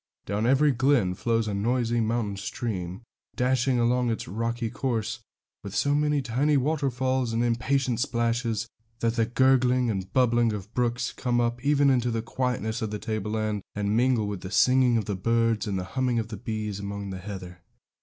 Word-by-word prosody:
Down 105 Hz, +4 st, -1 dB
every 140 Hz, +3 st, +4 dB
glen 130 Hz, -7 st, +2 dB
flows 115 Hz, +3 st, 0 dB
a 105 Hz, -, -2 dB
noisy 120 Hz, +3 st, 0 dB
mountain 110 Hz, -2 st, -1 dB
stream, 95 Hz, -1 st, -4 dB, 0.3 s
dashing 125 Hz, 0 st, +2 dB
along 120 Hz, +1 st, +2 dB
its 115 Hz, -, -3 dB
rocky 115 Hz, +4 st, -2 dB
course 115 Hz, -4 st, -2 dB, 0.4 s
with 100 Hz, -1 st, -7 dB
so 145 Hz, -, +2 dB
many 150 Hz, -1 st, +1 dB
tiny 135 Hz, +5 st, +2 dB
waterfalls 130 Hz, -3 st, 0 dB
and 115 Hz, +1 st, +1 dB
impatient 125 Hz, +1 st, 0 dB
splashes, 115 Hz, -3 st, 0 dB, 0.4 s
that 115 Hz, -1 st, +1 dB
the 115 Hz, -1 st, +1 dB
gurgling 125 Hz, -1 st, +3 dB
and 95 Hz, -2 st, -4 dB
bubbling 120 Hz, -2 st, +3 dB
of 105 Hz, +1 st, -7 dB
brooks 125 Hz, 0 st, 0 dB
come 120 Hz, -2 st, -1 dB
up 120 Hz, +1 st, -1 dB
even 145 Hz, -1 st, +4 dB
into 125 Hz, -2 st, +2 dB
the 115 Hz, -1 st, -2 dB
quietness 120 Hz, -2 st, -2 dB
of 110 Hz, -, -2 dB
the 105 Hz, -, -3 dB
tableland 110 Hz, 0 st, -2 dB
and 105 Hz, 0 st, 0 dB
mingle 120 Hz, -2 st, +2 dB
with 100 Hz, -3 st, -4 dB
the 95 Hz, -, -6 dB
singing 125 Hz, +2 st, +4 dB
of 110 Hz, -, -1 dB
the 100 Hz, -, -2 dB
birds 115 Hz, +2 st, +1 dB
and 100 Hz, -2 st, -1 dB
the 90 Hz, -, -2 dB
humming 130 Hz, -2 st, +1 dB
of 110 Hz, -1 st, -2 dB
the 110 Hz, -, -6 dB
bees 110 Hz, -2 st, -4 dB
among 100 Hz, 0 st, -5 dB
the 95 Hz, -, -5 dB
heather. 90 Hz, -3 st, -8 dB
115 Hz, 180 wpm, -26 LUFS, 105-125 Hz, 0.4 s, every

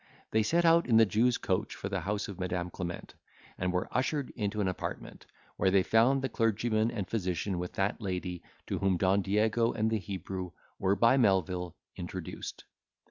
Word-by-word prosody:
They 110 Hz, -, +3 dB
set 170 Hz, +10 st, +2 dB
out 165 Hz, 0 st, +5 dB
in 115 Hz, -3 st, +5 dB
the 115 Hz, -, +7 dB
Jew's 115 Hz, +5 st, +2 dB
coach -, -, -1 dB
for -, -, -5 dB
the 95 Hz, -1 st, -2 dB
house 100 Hz, +4 st, -2 dB
of 100 Hz, -2 st, -8 dB
Madam 90 Hz, -1 st, -2 dB
Clement, 85 Hz, 0 st, -6 dB, 0.4 s
and 90 Hz, 0 st, -1 dB
were 90 Hz, 0 st, -1 dB
ushered 135 Hz, +1 st, -1 dB
into 105 Hz, -2 st, -3 dB
an 100 Hz, -, +1 dB
apartment, 90 Hz, -, -5 dB, 0.3 s
where 95 Hz, -, +3 dB
they 95 Hz, 0 st, +4 dB
found 125 Hz, +6 st, +3 dB
the -, -, +2 dB
clergyman 115 Hz, -1 st, +1 dB
and 105 Hz, -6 st, -4 dB
physician 95 Hz, -2 st, -2 dB
with 90 Hz, 0 st, -4 dB
that 100 Hz, +4 st, -1 dB
lady, 90 Hz, -3 st, -3 dB, 0.2 s
to -, -, -2 dB
whom 95 Hz, -2 st, +2 dB
Don 95 Hz, +3 st, +3 dB
Diego 110 Hz, +4 st, +2 dB
and 110 Hz, 0 st, 0 dB
the 110 Hz, -, +1 dB
Hebrew 95 Hz, -2 st, -5 dB, 0.3 s
were 95 Hz, +1 st, +2 dB
by 115 Hz, +5 st, +4 dB
Melvil 90 Hz, -6 st, +1 dB, 0.2 s
introduced. 90 Hz, -1 st, -6 dB
100 Hz, 185 wpm, -30 LUFS, 90-115 Hz, 0.4 s, the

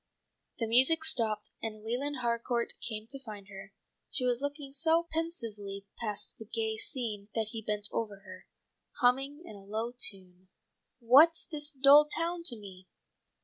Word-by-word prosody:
The 230 Hz, -, -1 dB
music 260 Hz, +8 st, +4 dB
stopped 225 Hz, -9 st, +3 dB
and 215 Hz, -1 st, -6 dB
Leland 255 Hz, +4 st, -3 dB
Harcourt 235 Hz, 0 st, -1 dB
came 215 Hz, -2 st, -4 dB
to 275 Hz, -, -7 dB
find 210 Hz, -4 st, -10 dB
her. 195 Hz, 0 st, -11 dB, 0.4 s
She 260 Hz, -4 st, -1 dB
was 245 Hz, 0 st, +1 dB
looking 285 Hz, -1 st, -5 dB
so 325 Hz, +4 st, +3 dB
pensively 225 Hz, -, -3 dB
past 210 Hz, -3 st, -2 dB
the 220 Hz, -, -9 dB
gay 220 Hz, 0 st, -2 dB
scene 220 Hz, -4 st, -3 dB
that 220 Hz, -2 st, -1 dB
he 225 Hz, -, -5 dB
bent 210 Hz, -1 st, -2 dB
over 210 Hz, -3 st, -4 dB
her, 185 Hz, -1 st, -13 dB, 0.5 s
humming 270 Hz, +5 st, +2 dB
in 215 Hz, -, -10 dB
a 200 Hz, -, -13 dB
low 220 Hz, +4 st, -3 dB
tone: 185 Hz, -6 st, -3 dB, 0.5 s
"'What's 285 Hz, +8 st, +6 dB
this 295 Hz, -1 st, -1 dB
dull 285 Hz, +2 st, +7 dB
town 335 Hz, +3 st, -2 dB
to 245 Hz, -, +5 dB
me? 190 Hz, -3 st, -12 dB
235 Hz, 155 wpm, -30 LUFS, 210-285 Hz, 0.5 s, dull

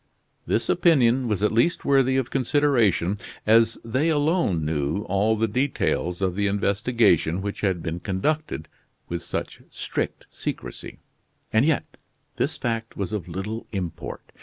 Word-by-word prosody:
This -, -, 0 dB
opinion 130 Hz, -6 st, +4 dB
was 105 Hz, -3 st, -1 dB
at 105 Hz, -, +3 dB
least 120 Hz, +10 st, +2 dB
worthy 135 Hz, -2 st, +4 dB
of 130 Hz, -2 st, -1 dB
consideration, 120 Hz, -, +2 dB, 0.3 s
as 115 Hz, +1 st, +4 dB
they 130 Hz, +8 st, +1 dB
alone 145 Hz, -, +1 dB
knew 75 Hz, +5 st, -1 dB
all 100 Hz, +3 st, +1 dB
the 110 Hz, +1 st, +1 dB
details 105 Hz, -6 st, 0 dB
of 95 Hz, -2 st, +1 dB
the 100 Hz, +2 st, 0 dB
investigation 100 Hz, -4 st, +2 dB
which 100 Hz, +1 st, -4 dB
had 95 Hz, -4 st, 0 dB
been 85 Hz, +1 st, -3 dB
conducted 95 Hz, -, -2 dB, 0.4 s
with 85 Hz, -1 st, -3 dB
such -, -, -5 dB
strict -, -, -4 dB
secrecy; -, -, -6 dB, 0.6 s
and 110 Hz, +4 st, +4 dB
yet 155 Hz, -2 st, 0 dB, 0.4 s
this -, -, -1 dB
fact 115 Hz, -1 st, -3 dB
was 100 Hz, +1 st, -3 dB
of 100 Hz, -6 st, -3 dB
little 95 Hz, +6 st, -5 dB
import. 90 Hz, -5 st, -5 dB
110 Hz, 140 wpm, -24 LUFS, 95-130 Hz, 0.6 s, opinion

